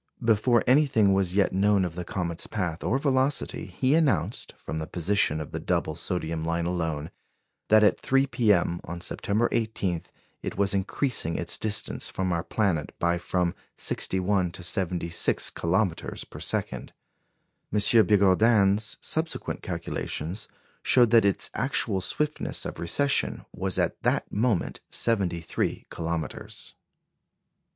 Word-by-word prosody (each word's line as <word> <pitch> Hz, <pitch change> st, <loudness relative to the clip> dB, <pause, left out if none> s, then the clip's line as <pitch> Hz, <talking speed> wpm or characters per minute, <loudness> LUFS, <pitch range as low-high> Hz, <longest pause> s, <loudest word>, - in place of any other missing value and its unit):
Before 115 Hz, +1 st, +3 dB
anything 125 Hz, -7 st, +4 dB
was 95 Hz, -1 st, +2 dB
as 90 Hz, -, -4 dB
yet 100 Hz, -1 st, +2 dB
known 100 Hz, 0 st, +3 dB
of 85 Hz, -, -4 dB
the 90 Hz, +1 st, -5 dB
comet's 85 Hz, -2 st, -3 dB
path 90 Hz, -6 st, -3 dB
or 130 Hz, -, +1 dB
velocity, 135 Hz, 0 st, 0 dB
he 130 Hz, +1 st, 0 dB
announced, 145 Hz, -, +1 dB
from 80 Hz, -, -5 dB
the 80 Hz, -, -4 dB
position 85 Hz, -3 st, +1 dB
of 75 Hz, -, -6 dB
the -, -, -4 dB
double -, -, -1 dB
sodium 80 Hz, -3 st, -3 dB
line 85 Hz, +1 st, -1 dB
alone, 80 Hz, -3 st, -2 dB, 0.6 s
that 110 Hz, 0 st, +6 dB
at 105 Hz, -, +4 dB
3 135 Hz, +1 st, +2 dB
p.m. 105 Hz, -9 st, +2 dB
on 85 Hz, +1 st, -6 dB
September 105 Hz, +5 st, 0 dB
18 110 Hz, -7 st, -1 dB, 0.4 s
it -, -, -5 dB
was 100 Hz, -1 st, +2 dB
increasing 100 Hz, -, -1 dB
its -, -, 0 dB
distance 110 Hz, -1 st, +1 dB
from 95 Hz, -1 st, -1 dB
our 85 Hz, -, 0 dB
planet 95 Hz, -8 st, -1 dB
by 85 Hz, 0 st, +1 dB
from 90 Hz, 0 st, 0 dB, 0.2 s
61 95 Hz, -1 st, 0 dB
to 90 Hz, -, -8 dB
76 85 Hz, -2 st, 0 dB
kilometres 90 Hz, +1 st, -1 dB
per -, -, -11 dB
second. -, -, -3 dB, 0.8 s
M. 105 Hz, -, 0 dB, 0.3 s
Bigourdan's 100 Hz, +1 st, +3 dB
subsequent 160 Hz, +1 st, -2 dB
calculations 85 Hz, +8 st, -4 dB, 0.3 s
showed 120 Hz, -3 st, +4 dB
that 115 Hz, -3 st, +6 dB
its 100 Hz, -, +1 dB
actual 115 Hz, -7 st, 0 dB
swiftness 150 Hz, +10 st, -1 dB
of -, -, -6 dB
recession 140 Hz, +12 st, 0 dB
was 95 Hz, 0 st, -2 dB
at -, -, -1 dB
that -, -, 0 dB
moment 110 Hz, -4 st, 0 dB
73 90 Hz, -7 st, -1 dB
kilometres. 80 Hz, -3 st, -5 dB
95 Hz, 135 wpm, -26 LUFS, 85-110 Hz, 0.8 s, that